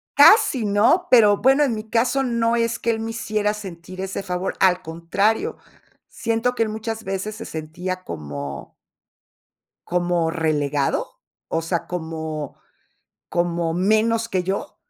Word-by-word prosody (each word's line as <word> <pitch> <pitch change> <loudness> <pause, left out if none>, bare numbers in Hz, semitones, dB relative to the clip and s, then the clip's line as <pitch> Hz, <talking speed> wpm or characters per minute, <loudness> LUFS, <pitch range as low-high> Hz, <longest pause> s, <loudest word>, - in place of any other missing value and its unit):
Casi 285 - +6
no, 220 - +3
pero, 210 -5 +7
bueno 270 +5 +4
en 255 -6 +1
mi 215 0 -7
caso 245 +4 +2
no 235 -2 +1
es 230 0 0
que 235 - -2
él 220 - -2
me 225 0 -3
hiciera 215 -2 -1
sentir 185 -3 -8
ese 195 +1 -4
favor. 180 0 -3
Al 185 -1 +4
contrario, 170 +7 -1 0.5
siento 230 +2 -1
que 230 - +2
él 220 - -2
muchas 220 +1 -4
veces 195 +2 -4
se 225 - -8
sentía 175 +4 -5
como 70 - -7 1.1
como 175 -2 0
relegado, 150 -4 0 0.4
o 165 - -1
sea, 165 +1 -2
como 160 -4 -5 0.7
como 170 -1 0
menos 220 +5 +2
que 185 -5 0
yo. 195 +10 -3
195 Hz, 140 wpm, -22 LUFS, 170-225 Hz, 1.1 s, pero